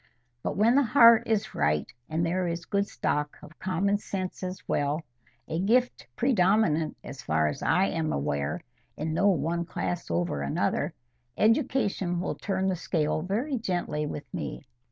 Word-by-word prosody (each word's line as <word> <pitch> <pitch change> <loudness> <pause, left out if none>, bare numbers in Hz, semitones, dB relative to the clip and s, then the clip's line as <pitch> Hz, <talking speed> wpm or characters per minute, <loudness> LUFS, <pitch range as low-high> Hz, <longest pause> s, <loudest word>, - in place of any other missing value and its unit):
But - - -3
when 220 +4 +5
the 280 - +5
heart 235 -2 +6
is 220 -1 0
right, 75 0 +1 0.2
and 160 +2 0
there 180 +2 0
is 170 0 -3
a - - -19
good 200 0 +1
stock 150 -5 -2
of 155 - -14
common 190 +2 0
sense 185 -3 -4
as 185 0 -6
well,—a 140 -1 -3
gift 245 +6 +1
predominant, 190 - +2
as 135 -2 -8
far 80 0 +1
as 75 - -6
I 180 +4 +3
am 160 -2 -1
aware, 70 0 -1 0.4
in 155 +1 -2
no 195 +5 +3
one 170 -1 +1
class 175 0 -4
over 85 -4 -1
another, 70 0 -1 0.4
education 215 - +1
will 180 - -2
turn 190 -1 -2
the 190 - +1
scale 155 -3 -1
very 230 - -1
gently 175 -7 -2
with 145 - -6
me. - - -5
175 Hz, 160 wpm, -28 LUFS, 150-205 Hz, 0.4 s, heart